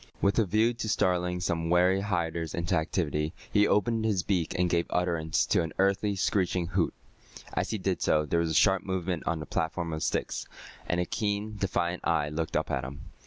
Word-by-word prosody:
With 100 +3 +2
a 110 - +4
view 110 +5 +2
to 115 -2 -4
startling 90 -2 +1
some 85 -2 -1
wary 90 +2 +4
hiders 85 -5 -2
into 85 0 -1
activity, 80 -1 -1 0.2
he 105 -1 +5
opened 110 +2 +2
his 105 -5 +1
beak 90 -5 -1
and 90 0 +2
gave 85 -1 +1
utterance 85 -3 +1
to - - +2
an 80 -2 -3
unearthly 100 +1 +2
screeching 95 -2 +1
hoot. 90 -2 0 0.6
As - - -1
he 110 - -1
did 95 -1 -1
so, 75 0 +2
there 85 +3 +1
was 85 -1 0
a - - -1
sharp 95 +1 +4
movement 95 -2 -2
on 85 -1 0
the 75 - -5
platform 80 +2 -2
of 80 - -4
sticks, - - -2 0.4
and 85 - 0
a 90 - +1
keen, 105 0 -2
defiant 90 -3 -1
eye 80 -3 +1
looked 80 +1 -2
up - - -2
at 65 -2 -1
him. 70 +3 -8
90 Hz, 205 wpm, -29 LUFS, 80-100 Hz, 0.6 s, he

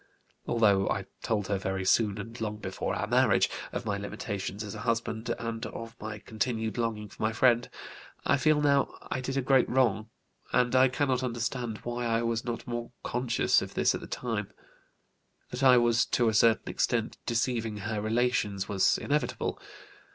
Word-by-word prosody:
Although 105 -5 +3
I 95 - -1 0.2
told 105 -3 -1
her 100 -2 0
very 95 0 -2
soon, 105 +1 +3
and 115 +3 -7
long 105 -1 -2
before 95 -3 -3
our - - -1
marriage, - - +3 0.2
of - - -4
my 100 0 -1
limitations 100 0 -4
as 105 - -6
a 110 - -7
husband 115 0 -2
and 115 -1 -4
of 115 0 -8
my 105 0 -5
continued 110 +1 -2
longing 110 -2 -2
for - - -14
my 110 - +2
friend, 120 +1 +3 0.6
I 140 - +4
feel 155 +2 +3
now 140 -1 +2 0.2
I 130 - -1
did 135 +1 -3
a 135 - +1
great 130 -1 +4
wrong, 115 -4 +2 0.4
and 125 0 +2
I 130 +1 +7
cannot 130 -1 0
understand 120 -2 -3
why 120 0 -2
I 115 0 +1
was 115 -1 -1
not 120 -1 -4
more 120 0 -4
conscious 120 -1 +1
of - - -7
this - - +3
at - - -4
the - - -8
time; 115 -5 -3 1.0
that - - -4
I 130 -2 +7
was 120 0 +4
to 120 -2 +2
a - - -1
certain 115 +1 +3
extent - - -1
deceiving 115 -2 0
her 105 +1 -3
relations 110 -3 0
was 100 -2 +3
inevitable. 150 +1 -1
115 Hz, 180 wpm, -29 LUFS, 105-125 Hz, 1.0 s, I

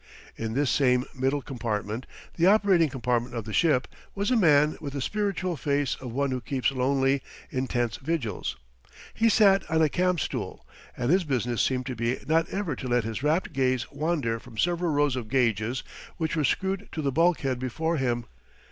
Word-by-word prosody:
In 115 0 -4
this 140 -1 +2
same 125 -2 +3
middle 135 +1 0
compartment 115 -2 -3 0.3
the 170 +1 +3
operating 195 -6 +4
compartment 125 -2 -1
of 115 - -3
the 110 - -6
ship 150 -7 +3 0.3
was 200 +4 -1
a - - +4
man 150 -7 +4
with 140 -3 -5
the 140 - -3
spiritual 195 +1 -1
face 140 -1 0
of 125 -2 -6
one 140 +2 0
who 130 -1 -2
keeps 135 +1 0
lonely, 135 +1 +1 0.3
intense 120 -5 -1
vigils. 120 - -3 0.6
He 230 0 +3
sat 200 -2 +5
on 160 -1 +2
a 155 - +3
camp 180 +1 +1
stool, - - -4 0.3
and 125 +3 0
his 185 +1 +4
business 125 -5 0
seemed 130 -1 0
to 130 -1 -4
be 115 +2 -1
not 160 +1 +2
ever 190 -7 -2
to 130 - -5
let 120 -1 +2
his 110 +2 -4
rapt 155 +5 0
gaze 130 -3 0
wander 140 -6 -1
from 115 -1 -14
several 175 +2 +1
rows 145 -2 +2
of 120 -4 -5
gauges 120 -1 +1 0.3
which 160 -1 -1
were 155 - +1
screwed 190 +7 -1
to 155 - -3
the 140 - +1
bulkhead 145 -5 +2
before 160 +7 -1
him. 120 -3 -1
135 Hz, 185 wpm, -27 LUFS, 125-165 Hz, 0.6 s, sat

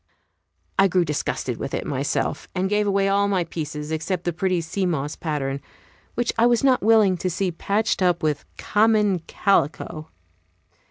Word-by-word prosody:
I 195 - +7
grew 180 -1 +2
disgusted 150 -2 -2
with - - -4
it - - -3
myself, - - -2
and 190 +2 -1
gave 210 0 +2
away 195 0 +2
all 200 +1 +2
my 190 -3 +1
pieces 150 -2 -5
except 170 +3 -2
the 175 - -1
pretty 185 +1 0
sea 180 +3 -2
moss 150 -4 -2
pattern, 140 -4 -3 0.5
which 240 0 0
I 235 - +6
was 240 0 +2
not 260 -2 +4
willing 215 -4 +4
to 185 - -2
see 180 +1 -1
patched 200 +5 -1
up 180 -2 +2
with 150 -2 0
common 210 -3 +2
calico. 160 -4 0
185 Hz, 165 wpm, -23 LUFS, 160-200 Hz, 0.5 s, I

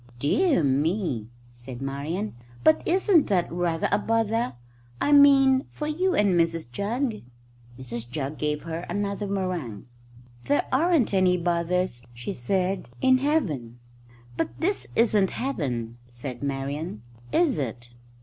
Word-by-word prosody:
"Dear 220 - +2
me!" 140 - 0 0.2
said 120 +1 -9
Marian; 145 +10 -3 0.3
"but 155 - +5
isn't 370 -2 +4
that 180 -4 +1
rather 170 -1 0
a - - +3
bother 225 - 0 0.5
I 290 - +1
mean 275 -2 +6
for 300 - -5
you 360 +5 0
and 205 -1 +3
Mrs 165 -6 +1
Jugg?" 220 - -2 0.6
Mrs 120 -2 -7
Jugg 140 +3 -4
gave 150 0 -1
her 165 0 -4
another 205 0 -2
meringue. 180 - -3 0.6
"There 145 0 +2
aren't 305 - +3
any 185 -1 +4
bothers," 175 -5 0
she 120 +1 -5
said, 185 +4 -1
"in 260 - +4
Heaven." 160 - -1 0.6
"But 165 - 0
this 385 +5 -1
isn't 210 -4 +4
Heaven," 125 - -3
said 120 +1 -7
Marian, 140 -1 -4 0.3
"is 320 - +2
it?" 120 -2 -5
175 Hz, 130 wpm, -26 LUFS, 135-230 Hz, 0.6 s, mean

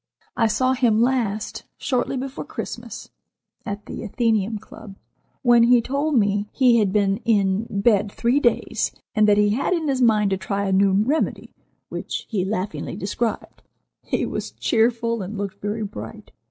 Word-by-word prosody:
I 225 - +3
saw 255 +4 +1
him 240 -4 +2
last 230 -4 0
shortly 260 0 -1
before 265 +1 -5
Christmas, - - -7 0.6
at 205 0 -5
the - - -7
Athenæum 220 -1 0
Club, 200 -1 -12 0.5
when 240 -2 +6
he 240 +1 +6
told 280 +5 -1
me 205 -1 +1
he 245 -3 +4
had 205 -3 +2
been 200 -1 +2
in 205 -2 +1
bed 205 0 +2
three 240 +6 +1
days, 240 -5 0 0.2
and 215 -2 +4
that 205 - +5
he 210 0 +4
had 260 - 0
it 340 - 0
in - - -2
his 265 -2 0
mind 215 -4 +3
to 190 - +1
try 200 +1 -2
a 195 - -1
new 195 +1 +4
remedy, 235 +11 0 0.4
which - - -5
he 200 -5 0
laughingly 185 -6 -3
described. 215 +3 -3 0.4
He - - -1
was - - -4
cheerful, 230 -1 +1
and 195 +3 -6
looked 200 -1 -5
very 210 +2 -2
bright. 205 0 -8
220 Hz, 165 wpm, -23 LUFS, 200-240 Hz, 0.6 s, when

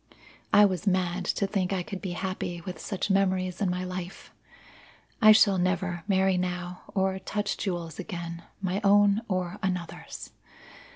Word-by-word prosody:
I 205 0 +8
was 190 +1 -1
mad 185 -1 +1
to 200 - 0
think 195 -2 -1
I 190 -2 0
could 195 0 -7
be 185 -3 -3
happy 185 -1 -3
with 180 +1 -7
such 195 0 -2
memories 185 -1 +1
in 195 - +2
my 180 +1 -2
life. 185 0 -7 0.9
I 215 -1 +9
shall 200 -3 +6
never 180 -1 0
marry 190 -2 +3
now 180 0 -3
or 190 -1 +1
touch 205 +2 -2
jewels 170 -5 -4
again 170 -3 -5 0.2
my 190 +2 -1
own 205 +1 +5
or 185 0 -2
another's. 180 -4 -4
185 Hz, 155 wpm, -28 LUFS, 180-195 Hz, 0.9 s, I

